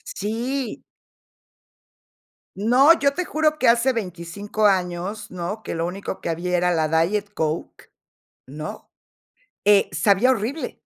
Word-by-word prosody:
Sí. 235 +4 -3 1.7
No, 250 +10 +5
yo 280 0 +2
te 360 +4 -2
juro 310 -1 0
que 255 - +2
hace 235 +3 +4
25 200 +1 -3
años, 190 +2 0
¿no? 185 +5 -5
Que - - -5
lo 165 0 -1
único 190 +2 -5
que - - -4
había 180 +2 -1
era 180 0 +2
la 160 -1 +1 0.2
Diet 205 +3 -2
Coke, 160 -1 -4 0.6
¿no? 150 +3 -8 0.7
Eh, 205 -1 +5
sabía 200 +9 +3
horrible. 255 +6 -2
205 Hz, 125 wpm, -23 LUFS, 175-235 Hz, 1.7 s, No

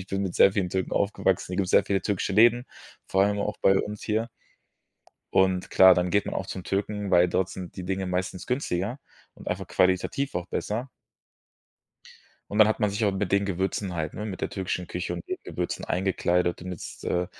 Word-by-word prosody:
ich 90 - -9
bin 95 0 -1
mit 95 -3 -3
sehr 95 - +6
vielen 95 -3 0
Türken 95 -1 -2
aufgewachsen. 95 -3 0
Hier - - -2
gibt's 95 -2 0
sehr - - +6
viele 100 -1 0
türkische 100 -1 -1
Läden, 120 +3 +5 0.4
vor 95 +1 +3
allem 105 0 0
auch - - -2
bei 95 0 +5
uns 105 0 -6
hier. 110 +2 0 1.0
Und 95 -1 +2
klar, 95 -1 +8
dann 90 0 0
geht 100 +2 +2
man - - -3
auch 95 - -3
zum 95 - -6
Türken, 100 0 -2
weil 90 0 +5
dort 95 +1 0
sind 90 -2 -8
die 90 - -5
Dinge 95 0 -2
meistens 90 0 -3
günstiger 125 -2 -2 0.4
und - - -14
einfach - - -3
qualitativ 95 +9 +1
auch 90 +1 -3
besser. 115 +8 -3 1.6
Und 105 - -2
dann 110 - +8
hat 110 - 0
man 105 - +3
sich 100 +2 -1
auch 100 - +2
mit 95 -1 -2
den 100 0 +3
Gewürzen 95 0 -2
halt, 80 -2 -3
ne, 105 - -5
mit 100 -3 -5
der - - -1
türkischen 90 -2 -3
Küche 90 0 -4
und 85 -1 -6
den - - -2
Gewürzen - - -4
eingekleidet 90 -2 0
damit's, 90 -3 -8
äh, 90 0 0
95 Hz, 205 wpm, -26 LUFS, 90-105 Hz, 1.6 s, klar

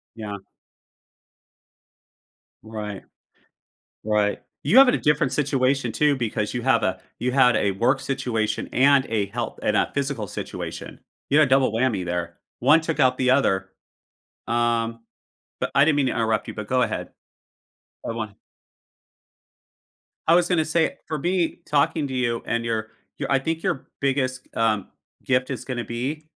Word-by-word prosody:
Yeah. 105 -2 -6 2.3
Right. 105 -2 -6 1.0
Right. 105 -1 +1 0.2
You 185 - +5
have 270 - +9
it 250 - +4
a - - +1
different 150 -3 +1
situation, 135 -3 +1
too, 145 +3 +2
because 110 -3 -2
you 120 - -2
have 130 -3 +3
a 95 0 -1 0.2
you 125 +1 -1
had 125 -2 +5
a 100 - +1
work 120 +7 +1
situation 125 -5 -2
and 140 +1 +5
a 105 -3 0
health 115 +4 -5
and 105 - +1
a - - +2
physical 140 -6 -2
situation. - - -7 0.3
You 145 - +4
had 155 - +6
a - - -7
double 130 -3 +4
whammy 115 -5 0
there, 85 -1 -4 0.2
one 145 +6 +5
took 160 -1 -2
out 130 -2 +3
the 130 -1 +2
other. 95 -8 +2 0.8
Um, 115 -1 0 0.6
but - - -1
I 140 - +6
didn't 150 -1 +3
mean 140 -2 +2
to - - 0
interrupt 110 -2 0
you - - -6
but 110 -1 -6
go 130 0 +2
ahead. - - -2 1.0
I - - -1
wan 110 -3 -5 1.9
I 165 - +6
was 175 0 +3
gonna 165 -4 +2
say, 160 +1 +1
for 155 - -2
me, 175 +2 0
talking 145 +1 +1
to 135 - -6
you 120 -2 0
and 115 0 -1
your 110 -2 -2 0.3
your - - -3
I 135 - +4
think 160 +4 -3
your 170 -8 -2
biggest 130 -2 0
g - - -28
um, 110 -3 +1 0.4
gift 125 -1 +1
is 130 -2 -4
gonna 125 -2 -3
be, 135 +7 -4
125 Hz, 165 wpm, -24 LUFS, 110-140 Hz, 2.3 s, have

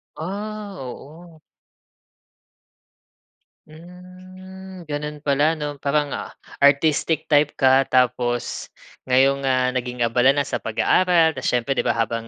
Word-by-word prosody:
Ah, 205 +3 -6
oo. 155 +6 -11 2.3
Hmm, 185 +2 -13
gano'n 150 0 -6
pala 145 +3 +2
'no, 145 -2 -6
parang, 145 0 0
ah, - - -6 0.2
artistic 150 +2 +2
type 145 0 +3
ka 130 0 +3
tapos 125 -1 0 0.4
ngayon, 135 +2 +3
ah, 130 -1 +1
naging 125 -1 -3
abala 125 +4 +3
na 145 - +1
sa - - -4
pag-aaral 165 +8 +2
tapos 130 -4 -5
siyempre 125 +2 0
'di 135 - 0
ba - - 0
habang, 115 0 -2
145 Hz, 115 wpm, -22 LUFS, 130-170 Hz, 2.3 s, type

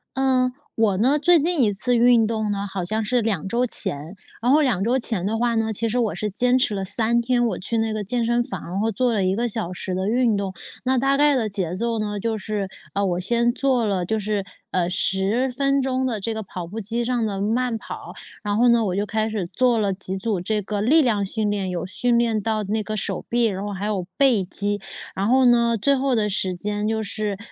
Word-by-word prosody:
呃， 260 -1 +2 0.2
我 215 -4 +2
呢 260 +8 +3
最 340 +3 +5
近 325 -2 +2
一 210 - +3
次 245 +5 +1
运 235 -1 +4
动 220 -2 -2
呢 200 0 -2
好 190 -1 -4
像 215 +5 -1
是 245 +3 +2
2 200 -6 -1
周 235 +5 0
前， 155 - -2 0.3
然 245 +2 +2
后 300 +2 +5
2 245 -10 +1
周 245 +5 +1
前 220 -7 -1
的 220 +3 -1
话 235 0 0
呢， 225 0 0
其 225 +2 0
实 235 +3 0
我 225 -4 0
是 210 - -2
坚 250 +5 +2
持 220 -5 +1
了 195 - -3
3 225 +4 +2
天， 240 0 +1
我 - - -2
去 230 +5 -2
那 220 -1 0
个 215 -1 -3
健 235 +4 -1
身 240 +1 +1
房 190 -6 -6
然 185 - -4
后 225 +2 0
做 240 +3 0
了 205 -3 +1
1 185 +1 +1
个 240 +1 0
小 220 -6 -3
时 185 0 -4
的 190 +2 -1
运 235 -2 +2
动。 195 -1 -3 0.3
那 260 0 +1
大 270 +2 +2
概 290 0 +4
的 230 -4 0
节 190 -5 -2
奏 230 +4 -2
呢， 210 -1 -3
就 225 +1 -2
是， 210 -1 -3 0.3
呃， 200 0 0
我 180 -2 -1
先 235 +5 +2
做 255 -3 +1
了 190 -4 -1
就 220 +4 -1
是， 205 -1 -2 0.3
呃， 175 -1 0
10 195 +7 +3
分 275 +2 +1
钟 260 0 -1
的 235 -4 -2
这 225 +3 -2
个 220 0 -4
跑 180 -3 -7
步 220 +6 -6
机 235 +4 -2
上 240 -2 0
的 200 -2 -3
慢 230 +3 0
跑， - - -9 0.3
然 205 -1 -1
后 245 +2 +4
呢， 235 -1 +4
我 185 - -1
就 200 +1 -1
开 220 +1 -1
始 205 -5 -3
做 250 -2 +2
了 205 -3 0
几 190 0 -4
组 200 -2 -2
这 210 +3 -1
个 205 +1 -3
力 300 +9 +5
量 215 -7 +1
训 210 +2 -2
练， 200 -2 -2
有 175 -2 -3
训 235 +5 +1
练 230 -2 +1
到 215 0 -1
那 215 +2 -2
个 215 0 -4
手 - - -2
臂， 240 0 +2
然 195 -3 -2
后 205 - -4
还 200 +1 -4
有 200 -4 -2
背 255 -8 +4
肌。 205 +2 -1 0.3
然 195 - -1
后 260 +1 +4
呢， 235 -1 +4
最 280 +7 +2
后 270 0 0
的 215 -2 +1
时 190 -2 +2
间 205 +3 -3
就 220 0 -1
是， 210 -1 -3
220 Hz, 255 characters per minute, -22 LUFS, 200-240 Hz, 0.3 s, 最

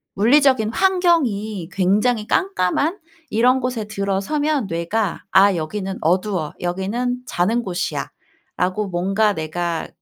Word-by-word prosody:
물리적인 240 0 +4
환경이 245 - +1
굉장히 210 +4 +1
깜깜한 335 - 0 0.3
이런 250 +4 +3
곳에 240 -4 -2
들어서면 215 +8 -1
뇌가 170 +4 -2
'아 195 0 +5
여기는 190 +4 -4
어두워. 180 -1 0
여기는 220 +8 -2
자는 220 +7 +1
곳이야.'라고 185 +1 -4
뭔가 195 +4 +1
내가 165 +1 -3
205 Hz, 265 characters per minute, -20 LUFS, 180-245 Hz, 0.3 s, 아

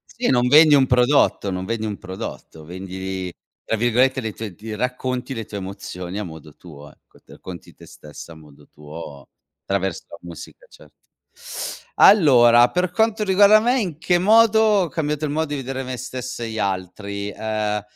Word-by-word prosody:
Sì, 240 +1 -1
non 125 -1 +2
vendi 150 +3 +7
un 135 -2 +5
prodotto, 125 -5 +2
non 90 0 -4
vedi 110 +1 -3
un 105 -2 -4
prodotto, 90 -3 -9
vendi 95 +1 -6 0.3
tra 115 - -2
virgolette 125 +3 +2
le 110 -2 -5
tue 105 -3 -7
"d" 110 +4 -8
racconti 125 +2 -3
le 115 - -5
tue 105 - -8
emozioni 95 -1 -7
a 105 - -3
modo 80 -4 -11
tuo, 75 -4 -14
ecco, - - -26
t - - -40
racconti 90 -2 -11
te - - -15
stessa 75 +2 -12
a - - -15
modo 75 -2 -18
tuo 75 -2 -11 0.4
traverso 95 -2 -2
la - - -10
musica, 85 - -12
certo. - - -19 1.0
Allora, 120 - +6
per 180 0 0
quanto 220 +2 +1
riguarda 205 +2 +5
me, 245 +4 +1
in 175 -9 -4
che 175 +1 +2
modo 220 +3 +4
ho 210 -5 +3
cambiato 150 -2 -2
il 145 - -3
modo 160 +2 -1
di 145 - -3
vedere 135 0 -5
me 130 0 -5
stesso 125 0 -7
e 115 - -4
gli 110 - -6
altri: 100 +1 -4
ehm, 105 -1 -3
115 Hz, 180 wpm, -21 LUFS, 95-150 Hz, 1.0 s, vendi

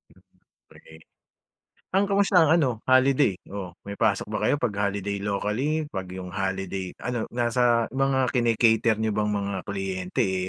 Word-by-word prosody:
Mm, - - -23 0.5
pre. 80 0 -16 0.9
Ang 195 +2 +2
kamusta 200 -1 +3
ang 160 -3 +5
ano 160 -6 +3 0.2
holiday, 130 -3 +4 0.2
oo 95 -3 -6
may 100 0 -8
pasok 110 -2 +1
ba 105 - -2
kayo - - +3
pag 105 - 0
holiday 100 0 -3
locally? 105 +10 -1
Pag 95 -2 -5
yung 90 -1 -7
holiday 95 -1 -3
ano 125 -2 -2
nasa 120 -1 +2
mga 130 -1 +1
kini-cater 115 -2 +3
niyo 110 - +1
bang 105 0 0
mga 100 -1 -2
kliyente, 95 +2 -2 0.2
eh, - - -5
110 Hz, 155 wpm, -25 LUFS, 100-130 Hz, 0.9 s, ang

